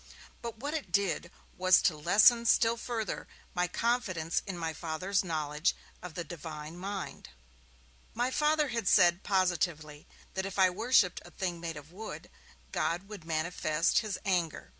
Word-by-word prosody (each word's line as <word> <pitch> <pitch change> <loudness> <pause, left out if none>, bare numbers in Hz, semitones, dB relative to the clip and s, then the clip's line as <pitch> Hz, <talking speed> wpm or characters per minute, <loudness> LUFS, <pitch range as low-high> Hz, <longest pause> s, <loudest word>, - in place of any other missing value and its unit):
But 235 -1 -6
what 285 +6 -4
it 290 - -4
did 185 -3 +1 0.3
was 185 0 +6
to 170 - +3
lessen 220 +9 +5
still 230 0 +4
further 230 -3 -4 0.3
my 180 0 +1
confidence 185 -6 0
in 190 -2 -4
my 165 -1 -2
Father's 170 +5 -1
knowledge 155 -2 0 0.3
of 175 -3 -8
the 175 - -3
Divine 160 -2 -8
mind. 190 0 -6 0.9
My 245 +3 0
Father 300 0 +2
had 230 -5 -2
said, 175 -2 +5
positively, 170 -6 0 0.3
that 190 - -2
if 195 - -7
I 185 -1 +5
worshipped 210 -2 +3
a - - -12
thing 175 -1 -3
made 165 -2 -5
of 150 +2 -11
wood, 215 +4 -8 0.4
God 175 +4 -1
would 200 -6 -9
manifest 160 0 +1
his 215 -4 -3
anger. 175 -5 -1
180 Hz, 155 wpm, -31 LUFS, 165-215 Hz, 0.9 s, was